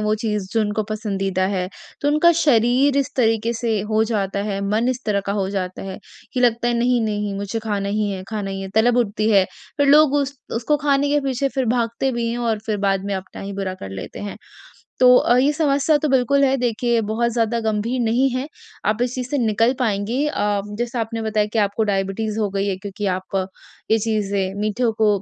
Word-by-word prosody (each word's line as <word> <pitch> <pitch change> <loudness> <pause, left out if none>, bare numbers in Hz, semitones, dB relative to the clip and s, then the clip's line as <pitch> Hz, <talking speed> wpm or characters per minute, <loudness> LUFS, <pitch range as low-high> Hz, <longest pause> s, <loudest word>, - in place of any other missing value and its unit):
वो 215 0 +1
चीज़ 210 -2 -2
जो 225 - +2
उनको 210 0 0
पसंदीदा 195 -3 -1
है, 185 -2 -1 0.3
तो 290 - +1
उनका 305 +4 +5
शरीर 260 0 +3
इस 280 -2 +1
तरीके 225 -2 +2
से 225 -2 -1
हो 215 0 +3
जाता 200 -3 -1
है, 195 -1 -2
मन 225 +4 +1
इस 255 0 -2
तरह 200 -1 +1
का 200 - 0
हो 195 -2 -1
जाता 185 -2 -4
है 190 -1 -6 0.3
कि 250 - -1
लगता 240 -1 +2
है 240 - +1
नहीं, 245 0 +2
नहीं 210 -1 -2
मुझे 200 +3 -3
खाना 205 -3 -2
ही 210 0 0
है 190 -1 -4
खाना 210 -3 -3
ही 195 0 -4
है, 195 - -5
तलब 235 +2 +4
उठती 215 -2 +1
है, 195 -3 +5 0.3
फिर 285 - +2
लोग 295 0 +6
उस 280 -1 -1 0.2
उसको 270 +6 +1
खाने 285 -1 +1
के 290 +1 +2
पीछे 275 0 -1
फिर 265 -2 +1
भागते 235 +2 0
भी 235 -1 -1
हैं 235 - -3
और 230 -2 0
फिर 215 -2 0
बाद 195 0 +1
में 200 0 -2
अपना 190 0 -7
ही 200 0 -5
बुरा 195 -1 -3
कर 140 - -8
लेते 95 0 -7
हैं। 205 -1 -6 0.6
तो 250 0 +8
अ, 240 - +4
ये 270 +4 +4
समस्या 295 0 +2
तो 300 - -1
बिल्कुल 275 +1 +3
है, 270 0 +3
देखिए 240 -1 +1
बहुत 225 +2 0
ज़्यादा 230 0 0
गंभीर 225 +3 -1
नहीं 240 +3 +2
है। 255 +2 -2 0.4
आप 210 +2 +1
इस 250 0 -1
चीज़ 255 -1 -4
से 290 - 0
निकल 230 0 +2
पाएँगी 230 +3 0
अ, 205 -9 0 0.2
जैसा 240 0 -2
आपने 225 0 -3
बताया 215 -1 +1
कि 225 - 0
आपको 205 +1 +1
डायबिटीज़ 205 +2 -1
हो 210 - +1
गई 195 0 -1
है 195 -2 -1
क्योंकि 200 +2 -5
आप 185 +1 -4 0.5
ये 220 - +5
चीज़ें 200 -3 -1
मीठों 225 +3 0
को 220 -1 +4
225 Hz, 220 wpm, -21 LUFS, 205-250 Hz, 0.6 s, तो